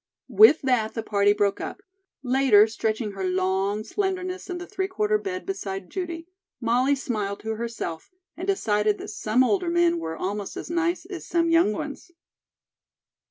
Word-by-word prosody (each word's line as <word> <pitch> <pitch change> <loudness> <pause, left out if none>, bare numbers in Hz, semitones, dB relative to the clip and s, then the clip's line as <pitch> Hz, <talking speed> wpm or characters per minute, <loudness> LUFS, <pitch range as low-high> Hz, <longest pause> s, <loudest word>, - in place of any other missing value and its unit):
With 430 -9 +7
that 245 -5 +1
the 225 - -3
party 205 -1 +3
broke 205 -1 +1
up. 395 - -6 0.4
Later, 255 -5 +5
stretching 220 -1 -2
her 195 -1 -6
long 190 +3 0
slenderness 375 - -3
in 360 - -3
the 355 - -7
three 385 0 -3
quarter 425 +2 0
bed 370 -2 -5
beside 195 - -5
Judy, 340 -3 -5 0.3
Molly 250 +4 +2
smiled 210 -7 -3
to 220 - -4
herself, 220 -8 -5 0.3
and 360 +4 -6
decided 210 - +1
that - - -8
some 215 +4 +1
older 360 +5 +1
men 345 0 +2
were 160 - -5
almost 200 +1 -4
as - - -6
nice 340 +1 0
as 365 -2 -8
some 335 0 +1
young 330 -9 +4
ones. 290 - -6
255 Hz, 160 wpm, -25 LUFS, -, 0.4 s, With